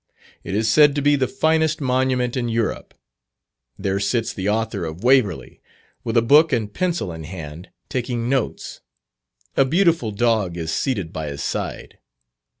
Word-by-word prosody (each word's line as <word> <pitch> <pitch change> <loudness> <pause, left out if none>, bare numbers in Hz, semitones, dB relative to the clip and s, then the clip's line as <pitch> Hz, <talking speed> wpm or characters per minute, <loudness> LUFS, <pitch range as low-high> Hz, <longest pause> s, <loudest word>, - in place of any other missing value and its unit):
It 95 - -4
is 110 +1 +1
said 145 +5 +5
to 145 - 0
be 145 0 +4
the 130 -2 +1
finest 160 +1 +1
monument 130 -2 0
in 120 -2 -1
Europe. 115 -1 -2 0.8
There 95 0 -1
sits 115 +2 -1
the 95 +1 -2
author 110 -2 -1
of 80 +4 -6
"Waverley," 105 - +2 0.4
with 115 -1 -1
a 115 - +4
book 150 +6 +5
and 110 -5 -1
pencil 170 - -1
in 80 0 -8
hand, 80 +1 -8 0.2
taking 120 -2 -2
notes. 130 -2 -2 0.7
A - - +5
beautiful 165 - +2
dog 105 -5 0
is 80 -1 -3
seated 100 - -2
by 80 -1 -4
his 70 0 -5
side. - - -5
115 Hz, 155 wpm, -21 LUFS, 95-135 Hz, 0.8 s, said